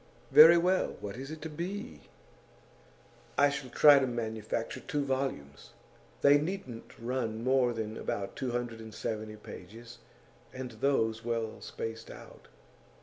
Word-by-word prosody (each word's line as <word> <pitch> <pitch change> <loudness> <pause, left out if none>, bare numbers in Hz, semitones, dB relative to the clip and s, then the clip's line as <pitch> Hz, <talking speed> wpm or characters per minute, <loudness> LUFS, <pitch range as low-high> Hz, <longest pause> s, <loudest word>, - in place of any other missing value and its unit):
'Very 165 +3 +10
well. 180 +2 +1
What 100 0 -6
is 135 +2 -7
it 155 0 -8
to 160 - -4
be?' 170 - -6 1.3
'I 145 0 +5
shall 140 -2 -5
try 145 +2 +7
to 135 - 0
manufacture 110 -2 -3
two 145 -1 -2
volumes. 130 - -4 0.5
They 145 +1 +7
needn't 150 -8 -6
run 120 -1 -2
to 110 +1 -6
more 130 -1 +3
than 110 -1 -4
about 100 -1 -4
two 130 - -3
hundred 120 -1 -3
and 110 -1 -10
seventy 110 -1 -4
pages, 115 +3 -11 0.5
and 130 -1 -6
those 115 -2 0
well 115 -2 -3
spaced 115 0 -6
out. - - -13
120 Hz, 145 wpm, -30 LUFS, 110-140 Hz, 1.3 s, Very